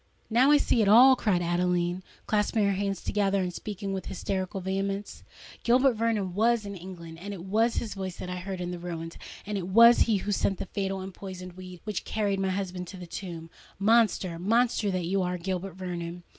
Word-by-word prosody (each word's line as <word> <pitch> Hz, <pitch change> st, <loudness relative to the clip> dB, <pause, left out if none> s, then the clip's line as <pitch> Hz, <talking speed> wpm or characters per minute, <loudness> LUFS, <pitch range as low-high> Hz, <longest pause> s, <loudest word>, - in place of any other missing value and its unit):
now 250 Hz, +5 st, +5 dB
I 295 Hz, -, +7 dB
see 245 Hz, -4 st, +2 dB
it 210 Hz, -, +3 dB
all!" 250 Hz, +6 st, +8 dB
cried 195 Hz, -8 st, +1 dB
Adeline, 175 Hz, +1 st, 0 dB, 0.2 s
clasping 210 Hz, 0 st, +1 dB
her 200 Hz, -, +3 dB
hands 195 Hz, -1 st, -2 dB
together, 200 Hz, -2 st, +1 dB
and 180 Hz, -1 st, -3 dB
speaking 200 Hz, +1 st, -5 dB
with 190 Hz, -2 st, -4 dB
hysterical 190 Hz, -1 st, -3 dB
vehemence: 195 Hz, +2 st, -3 dB, 0.4 s
"Gilbert 255 Hz, +2 st, +4 dB
Vernon 220 Hz, -5 st, -1 dB
was 225 Hz, +2 st, +2 dB
in 200 Hz, 0 st, -6 dB
England—it 175 Hz, +1 st, -8 dB
was 225 Hz, +4 st, +2 dB
his 225 Hz, -, -2 dB
voice 190 Hz, -2 st, -5 dB
that -, -, -6 dB
I 180 Hz, 0 st, -4 dB
heard 185 Hz, +1 st, -5 dB
in 175 Hz, 0 st, -3 dB
the 175 Hz, -, -5 dB
ruins;—and 170 Hz, +4 st, -6 dB
it 180 Hz, -, -5 dB
was 230 Hz, +5 st, +7 dB
he 220 Hz, -3 st, +3 dB
who 205 Hz, +2 st, -3 dB
sent 195 Hz, -1 st, +1 dB
the -, -, -4 dB
fatal 195 Hz, 0 st, -3 dB
and 190 Hz, 0 st, -7 dB
poisoned 185 Hz, -1 st, -8 dB
weed 185 Hz, -1 st, -10 dB
which 210 Hz, -3 st, -3 dB
carried 200 Hz, -3 st, -1 dB
my 190 Hz, 0 st, 0 dB
husband 185 Hz, -1 st, -3 dB
to 190 Hz, -, -9 dB
the 180 Hz, -, -8 dB
tomb! 165 Hz, -2 st, -7 dB, 0.3 s
Monster—monster 215 Hz, +1 st, +2 dB
that 185 Hz, -2 st, -1 dB
you 190 Hz, +3 st, +1 dB
are, 180 Hz, 0 st, -1 dB
Gilbert 185 Hz, +1 st, -4 dB
Vernon!" 175 Hz, -2 st, -5 dB
195 Hz, 195 wpm, -28 LUFS, 180-210 Hz, 0.4 s, all